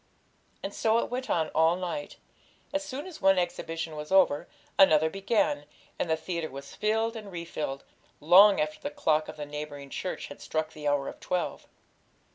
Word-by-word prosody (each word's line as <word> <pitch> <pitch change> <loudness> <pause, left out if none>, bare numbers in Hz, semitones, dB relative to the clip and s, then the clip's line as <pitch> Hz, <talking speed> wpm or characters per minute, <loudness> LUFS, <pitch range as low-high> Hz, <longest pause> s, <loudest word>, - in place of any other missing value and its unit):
And - - -4
so 225 0 +2
it 235 - -1
went 255 +1 -3
on 160 -2 +1
all 160 +1 +3
night; 185 +11 -4 0.6
as 290 0 0
soon 275 +1 -6
as 370 -4 -10
one 195 0 +5
exhibition 165 -2 -2
was 150 +2 -7
over, 185 -6 +4 0.3
another 160 -4 +6
began, 195 -7 +1 0.3
and 175 - -1
the 160 - +2
theatre 170 -1 -3
was 140 +1 -9
filled 225 +2 0
and 210 -3 -8
refilled, 165 -5 -4 0.4
long 190 +6 +7
after 155 0 -1
the 285 - -4
clock 155 - +1
of - - -8
the 150 - -4
neighbouring 145 -1 -7
church 185 - -4
had - - -11
struck 155 0 -2
the 150 -1 -5
hour 145 -1 +1
of - - -7
twelve. 180 -2 -3
170 Hz, 180 wpm, -28 LUFS, 150-205 Hz, 0.6 s, long